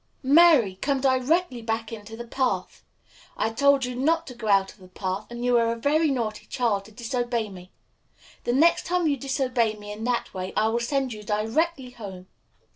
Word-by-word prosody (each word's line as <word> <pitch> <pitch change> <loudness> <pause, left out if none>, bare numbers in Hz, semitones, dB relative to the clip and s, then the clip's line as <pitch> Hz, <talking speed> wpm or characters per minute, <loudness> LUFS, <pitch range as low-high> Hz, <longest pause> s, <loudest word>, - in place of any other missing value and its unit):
Mary! 275 - +5
come 280 -1 +1
directly 260 +2 +1
back 225 0 -3
into 220 0 -8
the 235 - -7
path. 255 +2 -2 0.5
I 220 - 0
told 275 +3 +3
you 250 - -4
not 325 +6 +1
to 255 - -9
go 235 -2 -7
out 195 -1 +3
of - - -26
the 185 - -14
path, 190 +2 -4
and 240 0 -5
you 245 0 +3
are 230 0 +2
a - - -1
very 300 +6 +2
naughty 230 -6 -3
child 210 -5 0
to 220 - -14
disobey 240 -1 -2
me. 185 -1 -12 0.7
The 240 - 0
next 320 +6 +3
time 360 -1 +1
you 295 -2 +2
disobey 255 -4 0
me 205 0 -9
in 210 +2 -7
that 245 -1 -1
way 185 0 -5
I 220 +1 +3
will 235 +1 0
send 260 +1 -1
you 210 - -9
directly 250 +7 -1
home." 195 -6 -9
240 Hz, 200 wpm, -25 LUFS, 215-270 Hz, 0.7 s, Mary